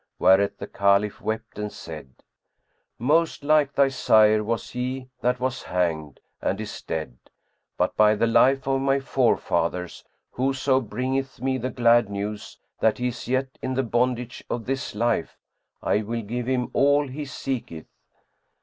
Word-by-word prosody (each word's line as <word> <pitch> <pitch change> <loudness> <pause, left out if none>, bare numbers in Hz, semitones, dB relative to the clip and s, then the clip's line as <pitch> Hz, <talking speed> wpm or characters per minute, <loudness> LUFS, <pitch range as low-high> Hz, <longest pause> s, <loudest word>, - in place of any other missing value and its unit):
Whereat 100 +1 +4
the - - -6
Caliph 100 +1 +1
wept 110 0 -4
and 105 0 -3
said, 75 -6 -10 0.8
"Most 155 +5 +1
like 150 -1 +3
thy 140 -1 +4
sire 110 -4 +4
was 115 +2 -3
he 130 +1 -4
that 125 0 +1
was 130 +1 -2
hanged 80 -5 -2 0.2
and - - -1
is - - -6
dead; 80 -6 -5 0.6
but - - 0
by 105 0 +5
the 110 - +2
life 135 +4 +4
of 135 0 +1
my 135 0 +2
forefathers, 90 -9 0 0.3
whoso 135 +1 +1
bringeth 130 +4 -3
me 130 +1 -1
the 125 +2 -2
glad 120 -3 +3
news 105 +1 -5 0.2
that 110 - +2
he 125 0 0
is 120 -2 -8
yet 130 +1 -1
in 130 0 -2
the 135 - +1
bondage 125 +1 -1
of 115 -2 -3
this 135 -3 -3
life, 115 -5 0 0.5
I 105 - +2
will 115 +2 -4
give 120 +3 -4
him 130 -1 0
all 145 +1 +3
he 140 +3 -6
seeketh!" 125 - -5
120 Hz, 155 wpm, -25 LUFS, 105-130 Hz, 0.8 s, by